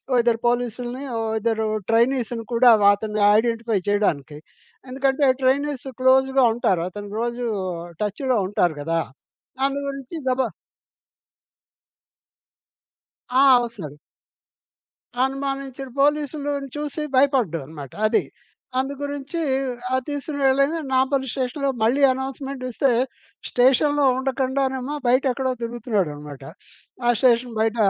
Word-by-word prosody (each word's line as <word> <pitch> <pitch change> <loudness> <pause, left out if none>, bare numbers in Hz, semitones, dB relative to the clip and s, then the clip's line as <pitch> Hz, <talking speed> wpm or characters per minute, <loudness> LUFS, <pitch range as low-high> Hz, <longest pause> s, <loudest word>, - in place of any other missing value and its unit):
ఓ - - +2
ఇద్దరు 230 -1 +1
పోలీసుల్‌ని, 245 +2 -2
ఓ - - -1 0.2
ఇద్దరు 220 0 0 0.2
ట్రైనీస్‌ని 235 0 +1
కూడా 240 +1 +6 0.2
అతన్ని 210 0 -4 0.2
ఐడెంటిఫై 230 -2 0
చేయడానికి 155 -8 0 0.5
ఎందుకంటే, 270 +2 +1 0.2
ట్రైనీస్ 275 +1 +1
క్లోజ్‌గా 265 0 +4
ఉంటారు 185 -7 +1
అతను 205 +1 -8
రోజు 240 +1 -2 0.6
టచ్‌లో 235 +5 0
ఉంటారు 175 -6 +1
గదా! 165 +2 0 0.6
అందు 275 +1 0
గురించి 275 +3 -6
గబా 260 +1 +1 2.8
ఆ! 260 +2 +4 0.2
ఒస్తాడు. 185 -12 -8 1.3
అనుమానించిన 275 0 -4
పోలీసులు‌ను 290 -1 0
చూసి 295 +1 -4
భయపడ్డనమాట 165 - 0
అది. - - +2 0.6
అందుగురించి 285 +3 -3 0.5
ఆహ్, 260 - +1
తీసుకొని 290 0 -4
వెళ్ళగా 275 +5 +2
నాంపల్లి 265 0 +1
స్టేషన్‌లో 270 +1 -1
మళ్ళీ 250 +6 +2
అనౌన్స్‌మెంట్ 265 0 -5
ఇస్తే 265 +2 +1 0.6
స్టేషన్‌లో 275 +3 +3
ఉండకుండానేమో 265 +1 -1
బయట 255 +2 +4
ఎక్కడో 260 +1 -1
తిరుగుతున్నాడన్నమాట. 185 - -3 0.6
ఆ - - +4
స్టేషన్ 240 -2 +3
బయట 225 +1 +1
255 Hz, 100 wpm, -23 LUFS, 225-275 Hz, 2.8 s, కూడా